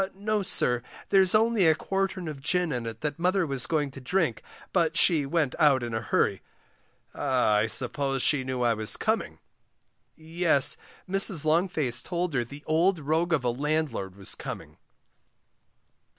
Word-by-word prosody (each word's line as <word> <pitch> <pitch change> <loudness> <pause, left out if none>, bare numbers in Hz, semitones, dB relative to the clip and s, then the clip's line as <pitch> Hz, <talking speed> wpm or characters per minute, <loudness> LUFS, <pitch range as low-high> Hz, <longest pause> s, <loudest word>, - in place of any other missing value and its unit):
No, 210 +1 -1
sir, 125 -10 +2 0.3
there's 190 0 +4
only 220 -4 +3
a 160 - +5
quartern 195 0 -3
of 150 -3 -7
gin 180 +2 0
in 120 -3 -3
it 115 0 -7
that 150 +1 -3
mother 180 +1 +1
was 135 -6 -2
going 150 -3 -1
to 135 - -11
drink, 155 - -1 0.3
but 165 -3 +1
she 155 -6 +3
went 150 -3 0
out 140 -5 +4
in 120 -1 -5
a 110 - -2
hurry. 100 -2 0 0.7
Ah, 130 -6 +1
I 105 +2 +1
suppose 135 +3 0
she 145 -3 +2
knew 130 -1 -3
I 120 -1 +3
was 110 -1 -3
coming. 220 +1 -1 0.8
Yes, 160 -3 +2 0.3
Mrs. 190 -4 +3
Longface 155 -6 0
told 175 -2 -3
her 125 -3 +1
the 140 +5 -12
old 170 +4 +2
rogue 160 +3 -1
of 160 -6 +1
a 120 - +1
landlord 140 -8 -2
was 100 -1 -3
coming. - - -8
150 Hz, 165 wpm, -27 LUFS, 125-175 Hz, 0.8 s, a